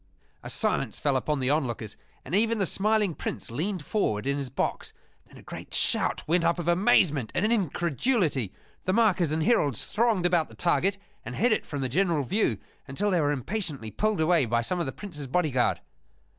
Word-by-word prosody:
A - - -8
silence - - 0
fell 140 -2 0
upon 145 +3 0
the 130 +1 +1
onlookers, 120 -8 -2 0.3
and 140 - -8
even 225 +3 +3
the 195 - +1
smiling 210 0 +1
Prince - - -5
leaned 170 - -2
forward 115 - 0
in 140 0 +1
his 140 -2 -4
box. 130 - -3 0.3
Then - - -16
a - - -14
great - - -7
shout - - 0
went 170 +2 +2
up 170 +1 +2
of 175 -2 -4
amazement 170 - +3
and 205 - +2
incredulity. 170 - 0 0.3
The 185 - +1
markers 190 -8 +3
and 155 0 +1
heralds 150 - +2
thronged 220 -4 +1
about 175 -3 +2
the - - -14
target 190 +3 +1 0.3
and 120 +2 -6
hid 240 - +2
it 215 - 0
from 145 -2 -4
the 130 - 0
general 165 +2 +1
view 170 - 0 0.3
until 200 +10 -1
they 175 -3 +2
were 145 -1 +2
impatiently 145 - -3
pulled 215 - 0
away 160 -4 +3
by 115 +1 +1
some 180 +9 -2
of 170 - -1
the - - -2
Prince's 150 -8 -7
bodyguard. 135 -4 +1
170 Hz, 195 wpm, -27 LUFS, 135-195 Hz, 0.3 s, even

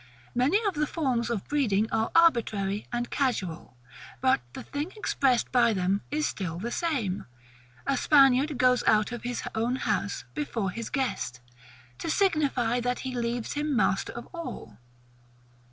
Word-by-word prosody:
Many 260 +10 +3
of 395 - 0
the 300 -1 0
forms 255 -9 -1
of 225 -5 -3
breeding 225 -8 +1
are 220 0 +1
arbitrary 215 -11 +3
and 240 0 -2
casual; 190 - -2 0.4
but 260 - +3
the - - -7
thing 290 +5 -4
expressed 270 - +1
by 235 -2 +4
them 190 +1 0
is 300 +1 0
still 170 -4 -3
the 230 +7 -4
same. 245 - -1 0.6
A 275 - +1
Spaniard 275 +1 +4
goes 250 0 +4
out 215 +2 +4
of 240 - -5
his 245 0 -3
own 230 +3 0
house - - -1
before 230 -10 -2
his 230 +3 -5
guest, 240 - -2 0.6
to - - -3
signify 285 - +2
that 245 +1 -1
he 260 -1 -4
leaves 235 -1 -2
him 295 -1 -1
master 190 -3 +1
of 235 - -7
all. 115 - -7
245 Hz, 155 wpm, -28 LUFS, 215-285 Hz, 0.6 s, by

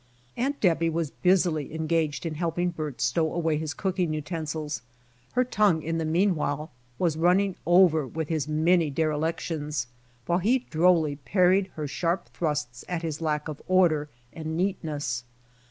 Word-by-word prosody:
Aunt 275 +4 -1
Debby 165 -3 +3
was 165 -2 -2
busily 175 -5 +1
engaged 160 -1 0
in 165 - -2
helping 175 +2 -1
Bert 155 -5 -5
stow 160 -2 +1
away 165 -3 0
his 155 -2 -4
cooking 180 -5 -1
utensils. 155 -3 -4 0.5
Her 250 - +3
tongue 210 -10 +2
in 165 +1 -1
the 160 - -1
mean 180 +5 +3
while 150 0 -2 0.3
was 165 -4 +1
running 180 +3 +3
over 175 -5 +5
with 160 +4 -4
his 155 -3 -1
many 160 +1 +3
derelictions, 155 -2 -1 0.4
while 175 +1 +1
he 240 +7 +2
drolly 160 -3 +3
parried 185 +5 +3
her 150 -2 -3
sharp 170 +5 -1
thrusts 145 -7 -3
at 175 -2 -2
his 160 -1 -3
lack 150 -1 -1
of 150 -2 -6
order 170 -5 +3 0.2
and 160 0 -4
neatness. 155 -9 -2
160 Hz, 155 wpm, -27 LUFS, 150-180 Hz, 0.5 s, over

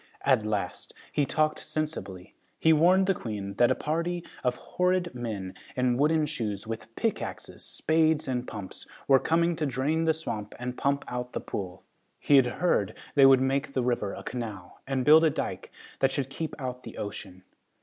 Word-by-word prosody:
At 130 -6 +3
last, 105 -4 -3 0.2
he 145 -2 +1
talked 155 0 +1
sensibly. 100 - -4 0.2
He 160 - +5
warned 180 +5 +5
the 195 - +3
Queen 105 - -5
that 120 - +5
a - - +3
party 170 +3 -2 0.2
of 125 -1 +1
horrid 180 +4 0
men, 105 -7 -4 0.2
in 125 -1 +2
wooden 150 +3 +3
shoes, 115 -10 -3
with 115 0 -6
pickaxes, 225 - -3
spades 160 -1 +1
and 125 -1 -2
pumps, 105 -4 -8 0.2
were 135 -1 +6
coming 170 +3 +2
to 155 - 0
drain 140 +6 0
the 160 - +4
swamp 105 -10 -5
and 125 0 -4
pump 140 +2 0
out 125 0 -4
the - - -2
pool. 95 -2 -6 0.4
He 145 - +5
had 130 -2 +5
heard 125 - +1
that - - -13 0.2
they 140 -2 +7
would 135 -1 +6
make 140 +1 0
the 130 - 0
river 120 -5 -1
a - - -8
canal 105 -7 -6
and 135 -2 -1
build 155 +3 +8
a 160 - +5
dyke - - -4 0.3
that 135 - +4
should 135 -1 -3
keep 160 +3 -4
out 125 -2 -4
the 115 - -10
ocean. 95 -3 -7
130 Hz, 185 wpm, -28 LUFS, 115-155 Hz, 0.4 s, build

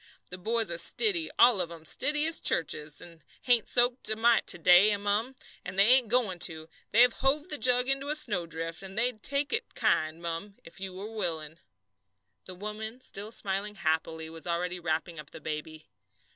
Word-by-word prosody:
The 180 - -8
boys 225 0 -1
are 170 - +1
stiddy, 365 - +3
all 235 -5 +6
of 170 - -3
'em, 165 -2 -12
stiddy 295 - +1
as 325 0 +4
churches. 150 -1 0
They 170 -1 -9 0.2
hain't 240 -4 +2
soaked 245 +1 +2
a 220 - 0
mite 230 +1 +2
to - - +3
day, 180 +5 +5
mum, 205 +6 -1 0.3
and 180 +1 -8
they 195 - +6
ain't 255 -2 +6
goin' 215 -6 0
to; 160 -2 +1 0.2
they've 240 +2 +5
hove 295 +5 -1
the 300 - -2
jug 250 0 +2
into 270 +1 -1
a 300 - 0
snowdrift, 165 - -3
and 195 +1 -10
they'd 240 -2 -1
take 280 +3 0
it 450 +2 -3
kind, 155 +1 0
mum 170 +4 -5
if 165 - -14
you 190 -1 -7
are 210 +3 -6
willin'." 165 -5 -3 0.9
The 185 - -8
woman, 215 +4 -7
still 210 -4 -5
smiling 205 0 -2
happily, 160 -2 -2
was 165 +1 -9
already 180 +1 -2
wrapping 165 0 -3
up 145 -2 -11
the - - -10
baby. 155 0 -7
200 Hz, 185 wpm, -28 LUFS, 165-245 Hz, 0.9 s, all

